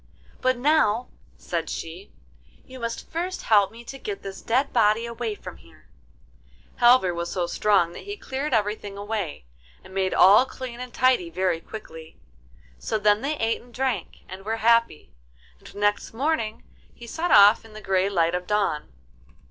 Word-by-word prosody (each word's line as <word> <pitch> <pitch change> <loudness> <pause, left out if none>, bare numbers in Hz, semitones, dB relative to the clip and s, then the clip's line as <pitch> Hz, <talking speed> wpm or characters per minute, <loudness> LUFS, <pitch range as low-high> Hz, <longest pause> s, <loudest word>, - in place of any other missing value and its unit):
'But 255 0 +2
now,' 250 -4 +2 0.3
said 165 -2 -4
she, 175 +5 -7 0.5
'you 260 -1 -11
must 230 -1 -5
first 355 +3 -3
help 205 -3 +4
me 230 +1 -12
to 270 +3 -9
get 410 +4 -6
this 195 -1 -7
dead 260 +4 0
body 225 0 +3
away 235 -2 -4
from - - -10
here.' - - -21 0.9
Halvor 240 -7 +5
was 170 0 -4
so 180 -2 -1
strong 185 -1 +2
that - - -10
he 405 +1 -6
cleared 275 -3 -4
everything 210 -3 -1
away, 200 - -4 0.4
and - - -14
made 190 -1 0
all 205 +7 +7
clean 255 -3 -8
and 250 0 -7
tidy 255 -9 +2
very 180 -1 -1
quickly. 165 -7 -10 0.6
So 220 - -2
then 210 0 +3
they 295 +2 -2
ate 225 -2 -1
and 245 - -19
drank, 250 -6 -3
and 190 +1 -9
were 220 +2 -2
happy, 230 -6 +2 0.5
and - - -15
next 205 +1 0
morning 255 -5 -1 0.3
he 235 - -11
set 325 +9 -3
off 205 +2 +7
in 225 -1 -15
the 215 - -9
grey 190 -1 +1
light 170 -3 +1
of 180 0 -3
dawn. 205 - -1
215 Hz, 170 wpm, -24 LUFS, 190-250 Hz, 0.9 s, all